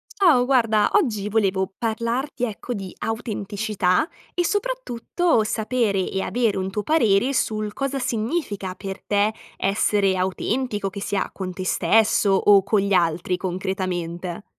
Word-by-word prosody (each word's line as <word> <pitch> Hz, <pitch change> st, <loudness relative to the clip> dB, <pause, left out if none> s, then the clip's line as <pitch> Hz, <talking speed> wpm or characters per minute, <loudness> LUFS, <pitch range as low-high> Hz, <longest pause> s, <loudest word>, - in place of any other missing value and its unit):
Ciao, 305 Hz, -11 st, +4 dB
guarda, 225 Hz, -5 st, +3 dB
oggi 230 Hz, -, +1 dB
volevo 195 Hz, -3 st, +1 dB
parlarti, 235 Hz, +4 st, -2 dB
ecco, 235 Hz, +2 st, -5 dB
di 195 Hz, -4 st, -6 dB
autenticità 210 Hz, -, -1 dB, 0.3 s
e 350 Hz, -, 0 dB
soprattutto 355 Hz, -, 0 dB
sapere 220 Hz, -3 st, 0 dB
e 190 Hz, -, -2 dB
avere 230 Hz, -3 st, 0 dB
un 190 Hz, 0 st, -2 dB
tuo 205 Hz, +2 st, -3 dB
parere 245 Hz, -4 st, +3 dB
sul 215 Hz, -4 st, -1 dB
cosa 275 Hz, +2 st, -2 dB
significa 220 Hz, -, -2 dB
per 195 Hz, 0 st, -7 dB
te 205 Hz, +1 st, +1 dB, 0.2 s
essere 195 Hz, 0 st, +2 dB
autentico, 205 Hz, +3 st, -1 dB
che 200 Hz, +1 st, -8 dB
sia 200 Hz, 0 st, -1 dB
con 185 Hz, -2 st, -5 dB
te 185 Hz, +1 st, -5 dB
stesso 215 Hz, +1 st, +3 dB
o 195 Hz, 0 st, +5 dB
con 205 Hz, +2 st, +2 dB
gli 200 Hz, 0 st, 0 dB
altri 175 Hz, 0 st, +1 dB
concretamente? 180 Hz, -1 st, -3 dB
210 Hz, 135 wpm, -23 LUFS, 190-240 Hz, 0.3 s, o